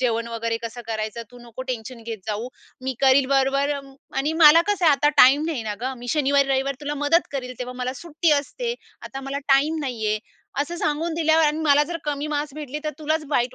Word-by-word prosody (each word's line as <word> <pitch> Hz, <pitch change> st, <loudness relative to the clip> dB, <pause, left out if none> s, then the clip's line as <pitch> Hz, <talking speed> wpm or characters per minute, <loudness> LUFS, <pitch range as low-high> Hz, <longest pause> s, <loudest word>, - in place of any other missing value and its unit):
जेवण 230 Hz, -2 st, 0 dB
वगैरे 230 Hz, 0 st, -2 dB
कसं 230 Hz, +1 st, -6 dB
करायचं. 220 Hz, 0 st, -3 dB
"तू 245 Hz, -, -14 dB
नको 240 Hz, +1 st, -9 dB
टेन्शन 235 Hz, -1 st, -5 dB
घेत 225 Hz, -1 st, -6 dB
जाऊ. 220 Hz, +3 st, -3 dB, 0.4 s
मी 265 Hz, -, -1 dB
करील 270 Hz, 0 st, +5 dB
बरोबर 275 Hz, +1 st, +2 dB, 0.5 s
आणि 280 Hz, +3 st, 0 dB
मला 315 Hz, +1 st, +9 dB
कसं 405 Hz, -3 st, +1 dB
आहे, 315 Hz, -, +7 dB
आता 285 Hz, +1 st, +3 dB
टाईम 275 Hz, +4 st, +7 dB
नाही 300 Hz, -8 st, -2 dB
ना 210 Hz, -1 st, -3 dB
गं. 260 Hz, +2 st, -2 dB
मी 245 Hz, +1 st, -9 dB
शनिवारी-रविवारी 275 Hz, -1 st, +1 dB
तुला 295 Hz, 0 st, -3 dB
मदत 295 Hz, +4 st, +2 dB
करेल. 255 Hz, -2 st, -4 dB
तेव्हा 250 Hz, 0 st, -5 dB
मला 250 Hz, 0 st, -2 dB
सुट्टी 335 Hz, 0 st, 0 dB
असते. 470 Hz, -, -4 dB, 0.3 s
आता 270 Hz, -, -7 dB
मला 275 Hz, +1 st, -4 dB
टाईम 285 Hz, +4 st, +3 dB
नाही 245 Hz, -6 st, -3 dB
आहे," 215 Hz, 0 st, +1 dB, 0.4 s
असं 335 Hz, +4 st, -3 dB
सांगून 320 Hz, +1 st, -1 dB
दिल्यावर 320 Hz, 0 st, +3 dB
आणि 300 Hz, +1 st, +1 dB
मला 295 Hz, -2 st, +4 dB
जर 340 Hz, +3 st, -4 dB
कमी 295 Hz, 0 st, -2 dB
मार्क्स 290 Hz, -1 st, -3 dB
भेटले 300 Hz, -1 st, -5 dB
तर 305 Hz, -, -1 dB
तुलाच 310 Hz, 0 st, -1 dB
वाईट 245 Hz, -3 st, +1 dB
275 Hz, 210 wpm, -23 LUFS, 245-300 Hz, 0.5 s, मला